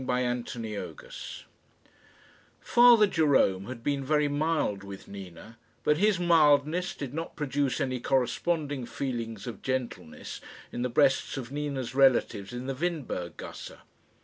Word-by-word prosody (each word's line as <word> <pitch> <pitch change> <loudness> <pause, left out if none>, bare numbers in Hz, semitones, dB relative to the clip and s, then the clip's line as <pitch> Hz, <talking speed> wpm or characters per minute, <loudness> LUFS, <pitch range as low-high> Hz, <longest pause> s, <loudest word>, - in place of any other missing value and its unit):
CHAPTER 125 -1 -1
XIV 120 - -7 1.2
Father 240 -3 +6
Jerome 140 - +2
had 120 -1 -8
been 140 0 0
very 150 +1 +2
mild 145 -9 0
with 100 -1 -9
Nina, 100 +3 -10 0.2
but 150 - +3
his 205 +1 +3
mildness 165 0 +3
did 140 -3 -6
not 165 +2 -5
produce 145 -2 -1
any 130 -1 -1
corresponding 140 +1 0
feelings 115 -7 -4
of 120 - -7
gentleness 130 -11 -4 0.3
in 120 - -4
the 125 - 0
breasts 135 +1 +2
of 130 -1 -6
Nina's 140 -4 -3
relatives 130 -7 +3
in 125 +1 -5
the 135 - -2
Windberg 140 - -3
gasse. - - -8
135 Hz, 130 wpm, -28 LUFS, 120-150 Hz, 1.2 s, Father